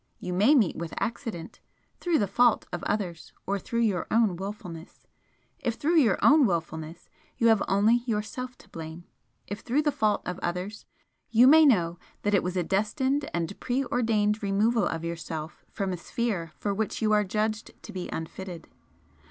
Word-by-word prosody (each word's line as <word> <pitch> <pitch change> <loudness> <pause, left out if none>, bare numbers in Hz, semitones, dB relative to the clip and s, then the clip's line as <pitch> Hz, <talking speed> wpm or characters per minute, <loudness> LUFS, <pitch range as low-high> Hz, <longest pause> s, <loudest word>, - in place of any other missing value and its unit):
You 180 - -4
may 210 +11 +5
meet 220 - +3
with 170 0 -5
accident 225 -7 -4 0.4
through 345 -3 +2
the 205 - +2
fault 240 +4 +3
of 175 - -3
others 180 -6 -3
or 200 +1 -1
through 235 +4 -2
your 205 -6 +1
own 220 -5 +3
wilfulness, 185 -3 -8 0.5
if 235 - -1
through 325 +7 +1
your 225 -10 +3
own 290 -3 +7
wilfulness, 165 -1 -4 0.3
you 230 - +4
have 220 -3 +4
only 205 +4 +4
yourself 245 +3 -3
to - - -19
blame 160 +1 -8 0.4
if 205 +1 -6
through 270 +8 0
the 295 - +2
fault 215 -5 +1
of 180 +1 -4
others, 180 +5 -4 0.4
you 235 +2 +6
may 310 +3 +8
know 175 -9 +2 0.2
that 205 - +1
it 200 - +4
was 180 +1 -3
a 180 - +1
destined 260 - 0
and 170 +3 -3
pre 260 +2 -1
ordained 220 -3 +1
removal 205 +1 +2
of 165 0 -3
yourself 165 -1 -6
from 195 -3 -2
a - - -3
sphere 185 -3 -3
for 205 - -1
which 215 +1 -2
you 215 - +3
are 210 0 +4
judged 215 +2 -2
to - - -9
be 185 -1 -5
unfitted. 170 +1 -7
205 Hz, 175 wpm, -27 LUFS, 175-235 Hz, 0.5 s, may